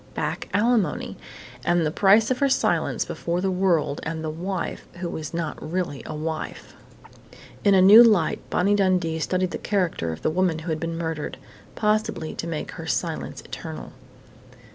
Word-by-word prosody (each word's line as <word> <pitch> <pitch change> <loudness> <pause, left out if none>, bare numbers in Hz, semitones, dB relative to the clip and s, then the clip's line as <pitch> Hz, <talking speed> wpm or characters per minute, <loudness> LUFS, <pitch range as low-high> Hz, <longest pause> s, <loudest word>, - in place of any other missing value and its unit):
Back - - -3
alimony! 210 -5 +1 0.5
And 175 +4 +2
the 150 - 0
price 210 +7 +4
of 255 - 0
her 280 -1 +3
silence 265 - +1
before 170 +1 -3
the 190 +1 0
world 170 -6 +1
and 160 0 -4
the 155 - -2
wife 180 +3 -4
who 175 0 -5
was 155 -3 -5
not 165 -1 -4
really 165 -3 -3
a 155 - -5
wife.... 155 +1 -5 0.9
In 200 -1 +5
a 185 - +6
new 210 +5 +10
light, 210 -9 +3
Bonnie 195 +3 +2
Dundee 180 -5 +1
studied 185 +2 0
the - - -4
character 180 - -1
of 80 - -8
the - - +2
woman 180 -1 +1
who 160 +1 -5
had 155 - -1
been 165 0 -3
murdered 160 -2 -4 0.4
possibly 210 -7 0
to 170 - -5
make 160 -2 -4
her - - -8
silence - - -2
eternal. - - -8
175 Hz, 170 wpm, -24 LUFS, 160-195 Hz, 0.9 s, new